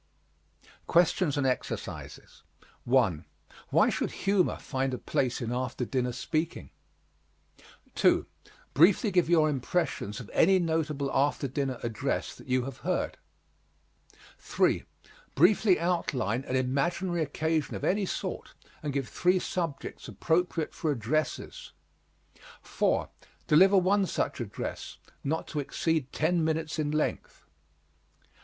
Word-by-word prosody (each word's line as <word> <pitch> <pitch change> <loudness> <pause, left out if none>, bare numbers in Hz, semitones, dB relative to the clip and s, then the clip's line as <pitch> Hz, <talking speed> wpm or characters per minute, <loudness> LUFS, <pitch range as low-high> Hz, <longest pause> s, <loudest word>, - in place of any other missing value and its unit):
QUESTIONS 170 -3 +3
AND 140 - +1
EXERCISES 130 -1 -4 0.4
1. 110 - +2 0.4
Why - - +4
should - - -1
humor 195 -2 +1
find 135 -1 -2
a - - -5
place 125 +1 -1
in 120 -1 -3
after 125 0 -2
dinner 125 0 -1
speaking? 155 +6 -3 1.2
2. - - +3 0.5
Briefly 190 - +5
give 180 -3 +2
your 160 -3 +5
impressions 135 - -1
of 120 - -9
any 190 +3 +5
notable 155 -5 -1
after 140 0 +1
dinner 135 -1 -2
address 120 +4 -2
that - - -15
you 130 -1 +1
have 135 -2 -7
heard. - - -2 1.2
3. - - +1 0.5
Briefly 185 +4 +4
outline 135 - 0
an 130 - -2
imaginary 170 +7 0
occasion 155 +1 -1
of - - -6
any 195 0 +1
sort - - -5 0.3
and 150 -2 -3
give 135 -2 -1
three 180 +1 +2
subjects 170 -7 -4
appropriate 160 - 0
for 160 - -2
addresses. 145 +5 -2 0.9
4. - - 0 0.4
Deliver 190 +6 +6
one 190 +1 +3
such - - -2
address, 100 -4 -6 0.3
not 160 +3 -1
to 150 - -3
exceed 150 0 -1
ten 165 +2 +1
minutes 160 0 -1
in 150 -1 0
length. 155 +1 -2
150 Hz, 120 wpm, -29 LUFS, 130-170 Hz, 1.2 s, Deliver